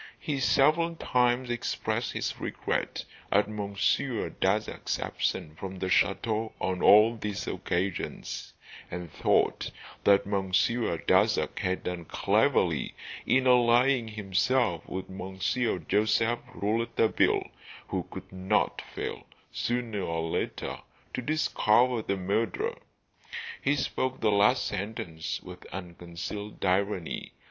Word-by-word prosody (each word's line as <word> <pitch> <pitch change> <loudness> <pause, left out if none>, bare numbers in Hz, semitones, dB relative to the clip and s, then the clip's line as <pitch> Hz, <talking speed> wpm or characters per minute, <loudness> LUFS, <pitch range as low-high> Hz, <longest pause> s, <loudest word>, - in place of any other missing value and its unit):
He 145 -3 -2
several 155 +6 +3
times 125 -3 +1
expressed 120 - -2
his - - -3
regret - - -2 0.3
at 105 +1 +4
Monsieur 105 +4 -1
Darzac's 105 +3 0
absence 80 -3 -2
from 95 0 -6
the 95 0 -2
chateau 110 +3 +1
on 95 -1 -1
all 110 +3 +7
these 105 -3 -4
occasions, 90 0 -3 0.4
and 90 -3 -6
thought - - +1 0.3
that 100 -1 +5
Monsieur 100 +1 +1
Darzac - - +2
had 95 0 -1
done 90 -2 -4
cleverly - - +1 0.3
in 130 0 +3
allying 125 0 +4
himself 105 -1 0
with 95 0 -4
Monsieur 95 +5 -1
Joseph 105 +7 +1 0.2
Rouletabille, 110 +2 +1 0.4
who - - -2
could - - -9
not 95 +3 0
fail, - - -5 0.2
sooner 120 -4 -2
or 80 -2 -2
later, - - -3 0.3
to - - -2
discover 125 -4 +2
the 100 -2 -2
murderer. 115 - -1 0.8
He 145 - +2
spoke 130 -1 -1
the 110 - +2
last 105 +5 +4
sentence 90 -6 -4
with 90 0 -10
unconcealed 90 +3 -6
irony. 95 -1 0
105 Hz, 110 wpm, -29 LUFS, 95-120 Hz, 0.8 s, all